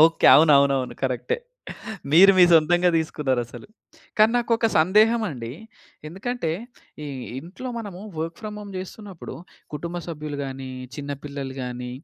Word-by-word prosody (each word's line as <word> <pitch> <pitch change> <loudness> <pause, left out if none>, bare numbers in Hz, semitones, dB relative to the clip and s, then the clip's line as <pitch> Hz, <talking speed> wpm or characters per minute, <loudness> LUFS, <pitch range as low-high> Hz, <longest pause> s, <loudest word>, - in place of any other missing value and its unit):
Okay. 165 0 +3
అవునవునవును. 140 -4 +4
కరెక్టె. 130 -3 -1 0.8
మీరు 195 +4 +8
మీ 180 - +8
సొంతంగా 175 +2 +5
తీసుకున్నారసలు. 135 -7 -2 0.5
కానీ 215 +1 +6
నాకొక 230 -1 +1
సందేహం 215 +8 +4
అండి. 120 -7 -6 0.6
ఎందుకంటే 195 0 -3 0.5
ఈ - - -5 0.3
ఇంట్లో 185 - -8
మనము 200 -5 -7 0.2
వర్క్ 165 +1 -4
ఫ్రామ్ 210 -1 -6
హోమ్ 205 -1 -9
జేస్తున్నప్పుడు, 190 0 -8 0.4
కుటుంబ 170 +4 -5
సభ్యులు 150 -3 -6
గాని, 135 0 -6 0.3
చిన్నపిల్లలు 140 -1 -6
గాని 125 0 -5
160 Hz, 120 wpm, -24 LUFS, 140-195 Hz, 0.8 s, మీరు